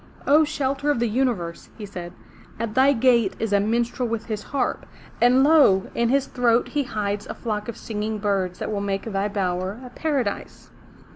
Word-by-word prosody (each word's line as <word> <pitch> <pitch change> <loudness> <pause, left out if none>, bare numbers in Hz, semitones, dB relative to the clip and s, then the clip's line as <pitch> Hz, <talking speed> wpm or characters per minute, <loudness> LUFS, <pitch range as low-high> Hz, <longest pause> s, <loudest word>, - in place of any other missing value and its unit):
''O, 300 +3 +5
shelter 285 -1 -1
of 290 - +2
the 235 0 +1
Universe,'' 215 -8 -1
he 215 - -6
said, 175 -3 -7 0.5
at 230 -2 -3
thy 265 +3 +5
gate 235 -5 +3
is 225 -2 -2
a 200 - +5
minstrel 235 +4 0
with 225 -1 -3
his 215 -3 -4
harp. 280 - -2 0.3
And 250 +2 +5
lo! 280 -11 +5
in 235 0 +1
his 275 +1 +2
throat 240 -1 +1
he 295 - 0
hides 205 -5 -3
a - - -6
flock 210 -3 -4
of 235 - -6
singing 215 0 -3
birds 195 -3 -1
that - - -4
will 205 -1 -2
make 195 -1 -2
thy 200 -2 -1
bower 190 0 -2
a 250 - -10
paradise. 270 -7 -3
225 Hz, 190 wpm, -23 LUFS, 200-255 Hz, 0.5 s, O